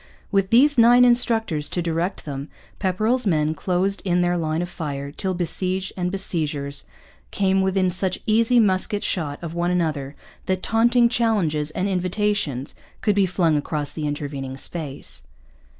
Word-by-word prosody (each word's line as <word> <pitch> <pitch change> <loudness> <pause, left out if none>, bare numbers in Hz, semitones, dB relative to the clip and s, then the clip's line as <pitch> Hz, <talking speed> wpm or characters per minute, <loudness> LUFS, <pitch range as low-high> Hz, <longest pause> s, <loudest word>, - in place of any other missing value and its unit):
With 195 -2 +1
these 265 +4 +5
nine 240 +2 +7
instructors 225 -10 +2
to - - -3
direct 170 +2 -2
them 140 0 -6 0.3
Pepperrell's 215 +6 0
men 155 -3 +1
closed 185 +4 -1
in 180 -2 +1
their 175 0 +1
line 160 0 -1
of - - -4
fire 140 -5 -5
till 185 +4 -2
besieged 185 +2 -1
and 180 -1 -1
besiegers 150 -7 -1 0.4
came 195 -1 +1
within 190 -1 +1
such 185 +1 +1
easy 230 +3 +3
musket 205 0 +1
shot 150 -5 -2
of 165 -1 -5
one 175 +1 -1
another 155 -6 -1 0.3
that 185 -1 -1
taunting 235 +2 +4
challenges 200 -11 +1
and 185 +5 -2
invitations 185 - -1 0.3
could 210 - +2
be 200 -1 +2
flung 170 -3 +1
across 145 0 -3
the 155 -2 -3
intervening 140 -2 -5
space. 140 - -4
180 Hz, 150 wpm, -22 LUFS, 155-205 Hz, 0.4 s, nine